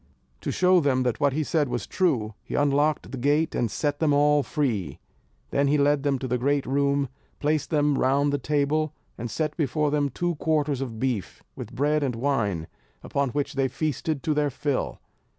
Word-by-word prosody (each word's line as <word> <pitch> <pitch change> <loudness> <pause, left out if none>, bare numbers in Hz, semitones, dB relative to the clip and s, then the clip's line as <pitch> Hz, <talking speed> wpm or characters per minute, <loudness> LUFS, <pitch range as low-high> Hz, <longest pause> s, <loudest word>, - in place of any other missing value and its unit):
To - - -3
show 185 0 +4
them 135 -4 +2
that 125 -2 -1
what 140 -2 +2
he 155 +2 0
said 150 -2 0
was 120 -1 -2
true, 125 - 0
he - - -5
unlocked 145 +1 +1
the 135 - -5
gate, 145 +5 +2
and 120 - 0
set 145 +7 -1
them 155 -3 +3
all 145 0 +4
free. 115 - -2 0.5
Then 140 0 +2
he 145 +2 +3
led 145 0 +3
them 140 -1 +1
to 130 - -4
the 125 0 0
great 140 +2 +1
room, 140 +1 +1 0.3
placed 150 0 0
them 150 -3 +2
round 140 +2 +2
the 145 - +1
table, 150 +2 0 0.2
and 120 +1 -5
set 150 +6 -2
before 150 -1 0
them 145 -1 +1
two 175 +6 -1
quarters 150 -3 0
of 120 -4 -4
beef, 120 -8 -2
with - - -8
bread 150 +2 +2
and 130 -4 -1
wine; 115 - 0 0.4
upon 140 -1 -1
which 145 +2 -2
they 135 -1 +1
feasted 155 +1 -2
to 155 - +1
their 150 -1 +1
fill. 140 0 -2
145 Hz, 195 wpm, -26 LUFS, 130-150 Hz, 0.5 s, show